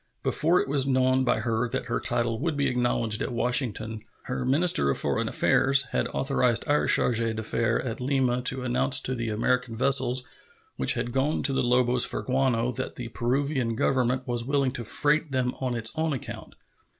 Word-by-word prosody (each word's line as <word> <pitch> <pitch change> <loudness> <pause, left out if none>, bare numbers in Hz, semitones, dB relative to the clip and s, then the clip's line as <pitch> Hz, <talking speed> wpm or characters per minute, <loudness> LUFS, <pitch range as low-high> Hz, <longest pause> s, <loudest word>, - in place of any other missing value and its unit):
Before 170 +4 +2
it - - -2
was 135 -1 +1
known 130 0 +2
by 125 -1 0
her 115 0 -1
that - - -3
her 115 - -2
title 115 -2 -1
would 155 +1 -2
be 140 - 0
acknowledged 120 -3 0
at - - -3
Washington, 115 -3 -1 0.2
her 125 0 -4
minister 135 - +3
of 70 - +1
foreign - - 0
affairs 135 +1 +3
had - - -1
authorized 125 -4 0
our 150 0 +1
charge 120 -2 +3
d'affaires 115 +1 -1
at 120 0 -5
Lima 130 -2 0
to 130 +1 0
announce 130 +2 +3
to 130 - -2
the 115 -2 -3
American 115 +2 -1
vessels 130 0 +2 0.5
which - - 0
had 120 0 -4
gone 135 +4 0
to 140 - +2
the - - 0
Lobos 125 0 +3
for - - -2
guano 125 -2 0
that 120 - -5
the 120 -2 -6
Peruvian 125 0 -1
Government 130 +1 0
was 120 -1 -1
willing 140 0 0
to 120 - -6
freight 150 +6 0
them 125 -1 -1
on 130 -2 -2
its 115 -1 +1
own 160 -1 -1
account. 130 - -8
125 Hz, 185 wpm, -26 LUFS, 120-135 Hz, 0.5 s, minister